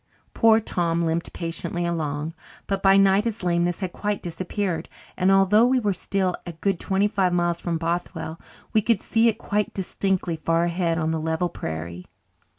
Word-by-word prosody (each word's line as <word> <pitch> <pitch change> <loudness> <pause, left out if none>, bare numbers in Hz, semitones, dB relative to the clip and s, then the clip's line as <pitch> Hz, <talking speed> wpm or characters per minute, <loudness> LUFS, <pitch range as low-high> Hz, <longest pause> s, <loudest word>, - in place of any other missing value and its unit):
Poor 225 -1 +5
Tom 170 -5 0
limped 165 +1 -1
patiently 170 +1 -3
along. 155 -2 -2 0.3
But 195 -1 -2
by 195 0 +6
night 195 +2 +4
his 230 -3 -3
lameness 175 +1 +1
had 185 -2 -3
quite 205 -1 -2
disappeared, 180 +1 -3 0.3
and 185 +1 +3
although 195 +4 +5
we 255 0 +3
were 205 -4 0
still 185 0 -1
a 175 - -7
good 185 +3 -1
twenty 195 +1 +1
five 195 -4 +1
miles 175 -1 +1
from 170 -1 -1
Bothwell 165 -1 -3 0.3
we 220 - +4
could 220 -1 +2
see 225 +3 +2
it 220 -1 +2
quite 210 -2 -2
distinctly 190 -2 -1
far 165 +1 +1
ahead 170 -1 0
on 160 -1 0
the 160 - -1
level 160 +2 0
prairie. 85 - -6
175 Hz, 175 wpm, -24 LUFS, 165-195 Hz, 0.3 s, by